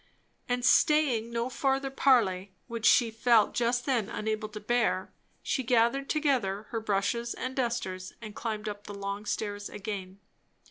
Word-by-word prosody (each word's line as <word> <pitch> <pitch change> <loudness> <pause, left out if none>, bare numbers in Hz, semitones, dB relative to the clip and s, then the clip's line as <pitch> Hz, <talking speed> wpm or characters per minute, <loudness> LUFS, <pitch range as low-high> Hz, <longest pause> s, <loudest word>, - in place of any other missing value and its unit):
And 245 0 0
staying 280 -7 +4
no 235 +1 -1
further 270 +1 0
parley, 200 -9 +2
which 230 -1 -1
she 235 -3 +5
felt 225 -1 +3
just 245 +1 0
then 240 -7 0
unable 215 0 -3
to 210 0 -7
bear, 215 -3 0 0.3
she 265 - 0
gathered 245 +3 +2
together 250 -10 +1
her 230 - -2
brushes 220 +3 -1
and 255 0 -4
dusters 225 -7 -2
and 215 -2 -8
climbed 215 -2 -4
up 205 0 -6
the 205 - -7
long 200 +1 -5
stairs 205 -1 -3
again. 195 -2 -6
225 Hz, 150 wpm, -29 LUFS, 205-245 Hz, 0.3 s, she